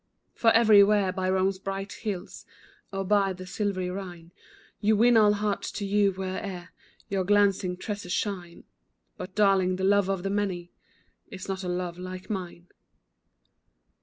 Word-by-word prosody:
For 230 - +3
everywhere, 210 -3 +5
by 185 0 -1
Rome's 190 0 +1
bright 195 +1 -5
hills, 205 -5 -6 0.4
Or 195 -1 -3
by 200 -1 +2
the 185 0 -9
silvery 185 -1 -2
Rhine, 175 -3 -8 0.5
You 215 +1 +2
win 240 +2 +5
all 210 -2 +6
hearts 205 0 -2
to 200 - -4
you, 200 0 +3
where'er 185 -1 -5 0.4
Your 195 -1 -1
glancing 195 -2 +2
tresses 205 -2 -5
shine; 180 -5 -3 0.5
But, 185 0 -8
darling, 195 -3 +3
the 190 - -4
love 200 0 +3
of 190 -2 -1
the 195 - -2
many, 190 -4 -2 0.6
Is 190 -5 -9
not 190 0 -4
a - - -4
love 180 -1 -3
like 185 +2 -7
mine. 180 -3 -5
195 Hz, 150 wpm, -27 LUFS, 185-205 Hz, 0.6 s, all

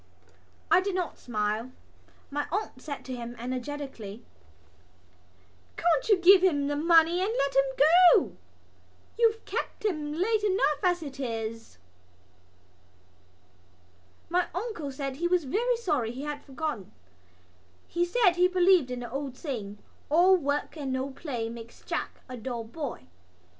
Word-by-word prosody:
I 370 - +6
did 390 0 -2
not 360 -2 -3
smile. 215 +1 -2 0.6
My 290 +1 -2
aunt 390 -9 -3
said 285 -1 -7
to 260 - -5
him 240 0 -7
energetically: 250 -3 -6 1.5
"Can't 330 +1 +1
you 415 - +6
give 365 +1 +7
him 290 -7 +3
the 290 +1 -1
money 330 +3 +4
and 395 +3 0
let 275 -1 0
him 275 - +6
go? 345 +5 +6 0.8
You've 450 -1 +2
kept - - -4
him 305 -7 -1
late 415 +5 +1
enough 375 -7 +2
as 355 -2 +1
it 275 -2 -8
is." 225 - -5 2.5
My 360 +1 +1
uncle 360 -8 -4
said 270 0 -5
he 345 +3 0
was 360 -1 +2
very 465 - 0
sorry 295 - -1
he 260 +3 -7
had 295 -1 -5
forgotten. 275 - -5 1.0
He 345 +1 0
said 360 -1 +3
he 360 +1 +5
believed 365 -5 +4
in 250 -1 -4
the 240 - -7
old 270 -1 -4
saying: 220 - -5 0.3
"All 355 +5 +6
work 290 -3 -2
and 280 -4 -4
no 260 +1 -2
play 250 -5 -4
makes 230 0 -10
Jack - - -4
a 255 - -7
dull 235 0 -4
boy." 265 - -6
290 Hz, 140 wpm, -28 LUFS, 255-360 Hz, 2.5 s, give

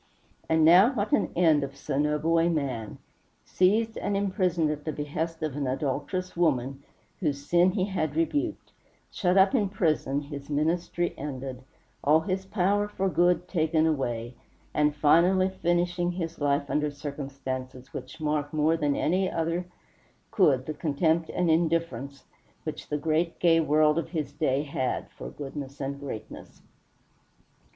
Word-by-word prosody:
And 160 -1 +4
now 185 - +7
what 215 -1 -2
an 290 - +2
end 160 -4 +4
of 140 0 -6
so 140 0 -3
noble 150 +3 +2
a 165 +1 +3
man! 130 -9 -2 0.5
Seized 220 +5 +2
and 200 - -1
imprisoned 185 -5 +1
at 150 -1 -5
the 155 - -2
behest 155 +3 -4
of 155 -4 -2
an 145 -2 -2
adulterous 145 +7 -2
woman 135 -5 0 0.4
whose 145 -5 -2
sin 175 +3 +4
he 190 -2 +1
had 160 -7 -2
rebuked, 295 - -1 0.4
shut 180 -1 +1
up 190 0 +5
in 210 -7 +2
prison, 155 -7 0
his 140 -1 -8
ministry 170 +3 0
ended, 130 -2 -5 0.4
all 155 +3 +5
his 190 +2 -3
power 205 +1 +1
for 195 -2 -1
good 180 0 +2
taken 160 -2 +1
away, 120 -6 -1 0.4
and 150 0 +2
finally 175 +6 +4
finishing 175 -1 0
his 165 -2 -5
life 140 0 +1
under 150 +1 0
circumstances 135 -3 -6
which 130 +5 -8
mark 150 -1 -1
more 155 +1 +2
than 145 -3 0
any 185 +3 +1
other 165 +2 -2 0.6
could 140 - +3
the 155 - -4
contempt 160 +2 0
and 175 -2 +1
indifference 160 -5 -1 0.4
which - - -6
the 150 - 0
great 160 +3 0
gay 165 -2 +4
world 155 0 +3
of 165 - -5
his 150 -5 -3
day 140 -2 0
had 135 -3 -3
for - - -8
goodness 140 - -7
and 140 0 -4
greatness! 135 -6 -9
155 Hz, 150 wpm, -27 LUFS, 140-175 Hz, 0.6 s, now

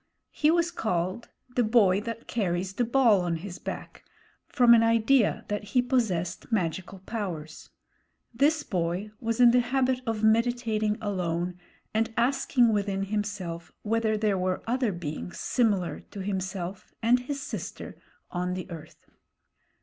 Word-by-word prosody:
He 300 - +2
was 340 +1 +2
called 185 - -2 0.2
the 245 0 0
Boy 210 -4 +4
That 230 +1 -6
Carries 185 -3 -1
the 245 - 0
Ball 235 -5 +4
on 175 -1 -1
his 180 +2 -7
Back, - - -7 0.4
from 245 -2 +6
an 230 - +7
idea 230 +1 +3
that 210 0 -2
he 205 +5 +2
possessed 230 -8 -1
magical 185 -1 -1
powers. 170 -9 -5 0.6
This 295 +6 +2
boy 180 +3 -2
was 230 0 -2
in 240 -1 +8
the 250 - +5
habit 255 +1 +1
of 220 -1 -1
meditating 220 -1 +2
alone 180 -3 -2 0.3
and 225 +1 +1
asking 240 -1 +3
within 200 -1 0
himself 200 -4 -4
whether 220 0 +1
there 210 -3 +1
were 185 0 -1
other 245 -1 +1
beings 175 -1 -6
similar 205 -8 +1
to 200 - -7
himself 190 -1 -4
and 240 +2 +5
his 275 +3 -4
sister - - -6 0.4
on 180 0 -2
the 185 0 -6
earth. 165 -3 -10
215 Hz, 140 wpm, -27 LUFS, 185-235 Hz, 0.6 s, in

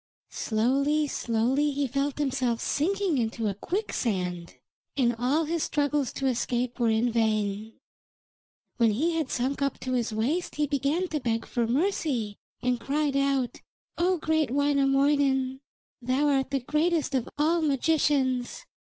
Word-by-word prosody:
Slowly, 275 +7 +1
slowly 255 +3 0
he 280 +1 0
felt 275 +2 -1
himself 260 -5 0
sinking 365 -1 0
into 225 -1 -1
a 200 - 0
quicksand, 190 - -3 0.4
and 240 -3 +2
all 275 +7 +2
his 330 +1 -1
struggles 290 -3 0
to 270 - -3
escape 245 -1 -1
were 235 -1 +3
in 225 +2 +2
vain. 215 -1 0 1.0
When 230 -3 +4
he 310 +11 +1
had 320 -4 -1
sunk 265 +3 -1
up 275 0 -1
to 255 - -3
his 240 -2 0
waist 260 +12 -1
he 300 - +1
began 290 +5 0
to 305 - -1
beg 230 -3 -1
for 235 -2 -1
mercy, 260 - -1 0.2
and 250 -1 +1
cried 285 +1 -1
out: 275 -3 0 0.3
'O 360 +2 +2
great 315 -3 +1
Wainamoinen, 275 -1 +2 0.4
thou 260 +4 +1
art 270 -2 +1
the 275 -1 -1
greatest 305 +3 0
of 255 -3 -1
all 325 +3 +2
magicians. 275 -4 +1
270 Hz, 140 wpm, -27 LUFS, 240-295 Hz, 1.0 s, When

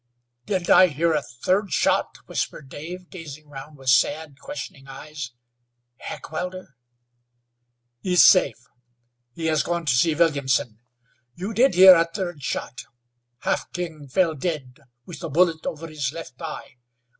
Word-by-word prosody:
"Didn't 185 -3 0
I 185 - +8
hear 165 +1 0
a 150 - +1
third 180 - -1
shot?" - - +1
whispered 135 - -4
Dave, 175 +5 -8
gazing 155 -4 -9
round 145 +1 -10
with 135 -1 +1
sad, 145 +3 +1
questioning 145 - -8
eyes. 140 0 -8 0.7
"Heckewelder?" 180 +1 -6 1.3
"Is 180 -1 +5
safe. 160 - +5 0.8
He 165 - -5
has 155 -1 +2
gone 170 -1 -2
to 135 - +3
see 150 +5 +3
Williamson. 140 -8 +1 0.6
You 195 +6 -5
did 255 +6 +3
hear 185 +1 +10
a 165 -1 +4
third 175 -5 -4
shot. 130 -1 -4 0.6
Half - - -1
King 165 -5 -5
fell 165 +4 +2
dead 145 -4 -4 0.3
with 175 -1 -10
a 165 - -3
bullet 165 +1 +2
over 160 +1 -5
his 150 -4 -3
left 150 -6 -10
eye. 155 -5 -7
160 Hz, 140 wpm, -24 LUFS, 140-175 Hz, 1.3 s, hear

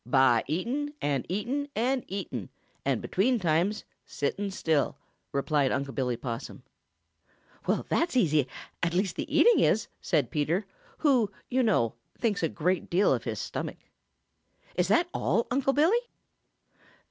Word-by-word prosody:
"By 125 -2 +4
eating 255 - -2
and 140 -3 -1
eating 255 +10 -2
and 250 +3 +1
eating, 175 - -5 0.3
and - - 0
between 240 +7 +2
times 180 +4 +1 0.2
sitting 200 +8 -2
still," 160 -7 0 0.3
replied 140 -1 +1
Unc' 140 0 -2
Billy 125 -3 -1
Possum. 115 -1 -6 1.0
"That's 335 -6 +1
easy, 155 - +3 0.3
at 170 0 0
least 190 0 +1
the - - -4
eating 475 -1 +6
is!" 220 - +2
said 145 -9 +1
Peter, 160 +7 0 0.3
who, 255 -9 +3 0.2
you 260 +1 +3
know, 190 - +2 0.2
thinks 220 -4 0
a 165 - +1
great 180 +4 -1
deal 185 +4 +4
of - - -2
his - - -3
stomach. - - -4 1.0
"Is - - +1
that 345 +1 +3
all, 230 - +1
Uncle 270 +1 +2
Billy?" 335 +12 +4
185 Hz, 135 wpm, -28 LUFS, -, 1.0 s, eating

